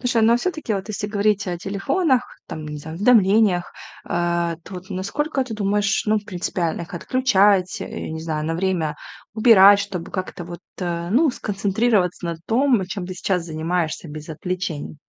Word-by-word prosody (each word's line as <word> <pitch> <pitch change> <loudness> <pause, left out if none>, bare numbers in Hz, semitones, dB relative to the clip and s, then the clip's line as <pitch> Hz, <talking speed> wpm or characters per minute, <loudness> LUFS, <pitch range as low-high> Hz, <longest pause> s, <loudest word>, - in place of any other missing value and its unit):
Слушай, 245 -3 +1
ну, 225 - +5
а 235 - +5
всё-таки, 310 -5 -2
вот 195 +1 -3
если 205 -1 -3
говорить 205 -1 +1
о 175 -1 -3
телефонах, 255 - +1 0.2
там, 155 -1 -7
не 150 0 -6
знаю, 160 +2 -8
уведомлениях, 205 -3 +4 0.3
а 170 -1 0
то 190 - -10
вот 180 +1 -9
насколько 265 +10 -2
ты 245 - -7
думаешь, 205 0 +1
ну, 215 0 +3
принципиально 175 -4 -3
их 170 - -9
отключать, 200 -3 +2
э, - - -6
я - - -6
не 160 - -5
знаю, 155 -1 -3
на 165 - -1
время 175 -3 -1 0.4
убирать, 205 -3 +7
чтобы 195 -4 -5
как-то 185 -1 -5
вот, 175 0 -8 0.2
э, 170 -2 -3
ну, 290 +7 +4
сконцентрироваться 200 -3 0
на 170 -1 -3
том, 240 -3 +3
чем 190 -1 -5
ты 185 - -6
сейчас 180 -1 -1
занимаешься 165 +1 -2
без 150 +1 -8
отвлечений? 175 -2 -4
190 Hz, 175 wpm, -22 LUFS, 170-215 Hz, 0.4 s, убирать